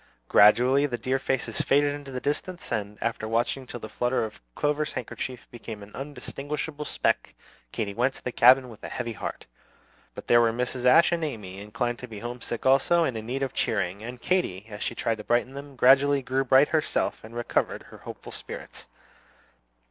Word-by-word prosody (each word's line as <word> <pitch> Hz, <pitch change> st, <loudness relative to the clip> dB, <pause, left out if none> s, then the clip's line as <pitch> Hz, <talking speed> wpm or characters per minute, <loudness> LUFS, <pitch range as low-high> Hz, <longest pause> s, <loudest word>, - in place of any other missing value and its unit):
Gradually 125 Hz, -, +6 dB
the 120 Hz, -3 st, -3 dB
dear 130 Hz, +2 st, 0 dB
faces 120 Hz, -4 st, -1 dB
faded 145 Hz, +1 st, +3 dB
into 140 Hz, -3 st, -6 dB
distance; 170 Hz, +6 st, -3 dB
and 105 Hz, -2 st, -2 dB
after 115 Hz, -1 st, -2 dB
watching 120 Hz, +3 st, -1 dB
till 120 Hz, -, -7 dB
the 110 Hz, -, -7 dB
flutter 120 Hz, +2 st, 0 dB
of 110 Hz, -, -10 dB
Clover's 150 Hz, +1 st, 0 dB
handkerchief 125 Hz, +1 st, -5 dB
became 110 Hz, -3 st, -8 dB
an 100 Hz, -, -13 dB
undistinguishable 145 Hz, +2 st, -5 dB
speck, -, -, 0 dB, 0.4 s
Katy 100 Hz, -3 st, -3 dB
went 125 Hz, +5 st, +1 dB
to -, -, -13 dB
the 125 Hz, -, -2 dB
cabin 125 Hz, +2 st, +6 dB
with 115 Hz, -4 st, -13 dB
a -, -, -5 dB
heavy 120 Hz, -2 st, -4 dB
heart. -, -, -6 dB, 0.7 s
But -, -, -8 dB
there 120 Hz, 0 st, +6 dB
were 115 Hz, -1 st, +3 dB
Mrs. 125 Hz, +1 st, -3 dB
Ashe 165 Hz, +8 st, +6 dB
and 170 Hz, -1 st, 0 dB
Amy, 105 Hz, -10 st, -5 dB
inclined 115 Hz, +4 st, -3 dB
to 125 Hz, -, -7 dB
be 110 Hz, -3 st, -9 dB
homesick 120 Hz, +1 st, -5 dB
also, 135 Hz, +6 st, +4 dB
and 130 Hz, -7 st, -1 dB
in 110 Hz, 0 st, -5 dB
need 135 Hz, +3 st, -2 dB
of 135 Hz, -1 st, -2 dB
cheering; 100 Hz, -2 st, -1 dB
and 120 Hz, +2 st, -7 dB
Katy, 120 Hz, -, 0 dB
as 105 Hz, -1 st, -8 dB
she 115 Hz, -, -2 dB
tried 115 Hz, -1 st, -1 dB
to -, -, -6 dB
brighten 120 Hz, +3 st, +1 dB
them, 140 Hz, 0 st, -9 dB
gradually 135 Hz, +2 st, +5 dB
grew 130 Hz, +1 st, 0 dB
bright 135 Hz, +3 st, +5 dB
herself, 155 Hz, -2 st, 0 dB
and 110 Hz, +2 st, -11 dB
recovered 120 Hz, 0 st, -1 dB
her -, -, -14 dB
hopeful -, -, -9 dB
spirits. -, -, -8 dB
125 Hz, 190 wpm, -27 LUFS, 115-140 Hz, 0.7 s, Gradually